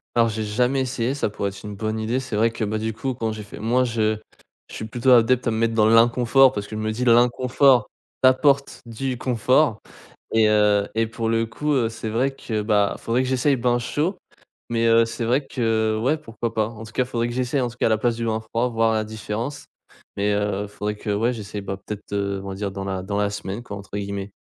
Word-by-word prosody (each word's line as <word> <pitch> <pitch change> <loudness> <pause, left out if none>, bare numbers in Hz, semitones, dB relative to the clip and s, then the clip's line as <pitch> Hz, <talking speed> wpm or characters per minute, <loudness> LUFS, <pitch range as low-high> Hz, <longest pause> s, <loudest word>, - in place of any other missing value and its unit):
Alors 115 -1 +4
j'ai 110 0 -3
jamais 125 +6 +1
essayé 125 -1 -1
ça 140 - -1
pourrait 100 -1 -3
être 100 - -12
une 105 -1 -6
bonne 110 +2 -3
idée. 115 +4 -1
C'est 130 -4 -5
vrai 115 +2 +3
que, 115 - -4
bah, 110 +1 -1
du 110 0 -2
coup, 130 +4 -3
quand 115 -2 -2
j'ai 110 -1 -6
fait 100 - -11
moi 120 +4 +2
je 110 -3 0 0.5
je - - -10
suis 110 - -5
plutôt 120 +3 +1
adepte 125 +1 +4
à - - +2
me 110 - -1
mettre 115 0 +1
dans 110 -1 +4
l'inconfort 120 +3 +5
parce 105 -5 -4
que 110 - -7
je 110 - -3
me 110 - -1
dis: 125 +4 -2
«L'inconfort 125 +1 +4 0.3
t'apporte 140 +2 +3
du 125 +3 -3
confort» 125 0 +2 0.5
et, 110 -1 +4
heu, 105 -1 +3
et 115 0 +1
pour 115 0 -3
le 115 0 +2
coup, 150 +7 -2
heu, 120 -4 +2
c'est 110 0 -6
vrai 125 +5 +1
que, 110 -5 -3
bah, 105 -2 +2
faudrait 120 +3 0
que 130 - -2
j'essaye 130 +2 +2
bain 120 0 +1
chaud, 150 - -1 0.5
mais, 115 0 +1
heu, 115 0 +5
c'est 115 +1 -4
vrai 130 +4 +1
que 110 -3 0
ouais 150 +6 +2
pourquoi 115 -4 -5
pas. 110 -1 +1
En 110 -1 -10
tout 110 - -12
cas 130 - +1
faudrait 120 -2 -1
que 120 - -5
j'essaye 130 +2 0
en 120 - 0
tout 120 - -15
cas - - +3
à - - +4
la 110 - +2
place 120 +1 0
du 115 0 -3
bain 110 0 0
froid 115 +2 -1
voir 115 -1 +2
la 110 0 0
différence, 110 +5 -5 0.5
mais, 105 +1 +1
heu, 105 0 -1
faudrait 105 +1 -4
que 105 - -5
ouais 115 +4 +1
j'essaye 105 -3 -6
ben 100 -1 -5
peut-être, 105 +1 -9
heu, 100 -1 -1
on - - -6
va 95 - -4
dire 100 +1 -3
dans 95 0 -5
la 95 -1 -3
dans 100 +2 -3
la 105 0 +1
semaine 100 +2 -5
quoi 100 -4 -7
entre 100 - -13
guillemets. 100 0 -4
115 Hz, 250 wpm, -23 LUFS, 105-125 Hz, 0.5 s, l'inconfort